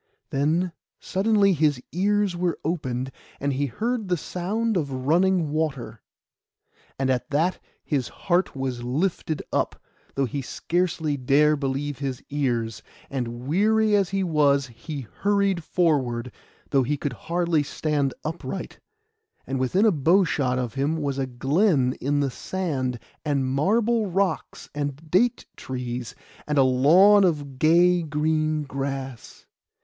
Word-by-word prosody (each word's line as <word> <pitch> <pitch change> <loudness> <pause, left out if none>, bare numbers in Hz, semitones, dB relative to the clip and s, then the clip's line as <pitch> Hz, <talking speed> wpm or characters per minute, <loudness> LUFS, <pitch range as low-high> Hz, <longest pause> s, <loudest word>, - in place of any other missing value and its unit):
Then 160 +6 +1 0.3
suddenly 200 0 +2
his 150 -4 +2
ears 200 +1 +1
were 175 -1 -1
opened, 130 -6 -2 0.3
and 140 0 -1
he 140 +2 0
heard 220 - -2
the 180 -1 +1
sound 210 +8 -2
of 150 -6 -1
running 175 0 +3
water. 150 -5 -2 1.0
And 130 0 +1
at 125 +3 -1
that 160 +5 +1 0.2
his 135 -5 -1
heart 180 -2 0
was 130 -2 -3
lifted 155 +4 -1
up, - - 0 0.4
though 135 - +1
he 135 +3 -3
scarcely 160 +1 -1
dare 145 +4 +4
believe 140 0 -3
his 135 -2 -4
ears; 120 -7 -1 0.3
and 120 -2 -4
weary 215 +6 +3
as 195 -3 +2
he 195 0 0
was, 145 -5 +3
he 140 +5 -7
hurried 195 - 0
forward, 130 -9 0 0.4
though 135 - +4
he 145 +4 0
could 140 -1 -3
scarcely 170 -1 +1
stand 145 -1 -1
upright; 150 - -5 0.7
and 135 +1 -3
within 180 - +2
a 220 - +6
bowshot 150 -5 +2
of 125 -2 -2
him 140 +4 0
was 140 -3 -2
a 135 - -1
glen 135 - +2
in 145 +2 +1
the 140 -2 0
sand, 135 -8 -2 0.3
and 140 -3 0
marble 215 - +1
rocks, 185 -1 -1
and 145 +2 -5
date 240 +7 +2
trees, 125 -2 -5 0.3
and 150 -1 0
a 135 - +6
lawn 170 +11 +6
of 145 -7 -1
gay 175 +3 +5
green 155 0 0
grass. 135 -3 -5
150 Hz, 135 wpm, -25 LUFS, 135-180 Hz, 1.0 s, a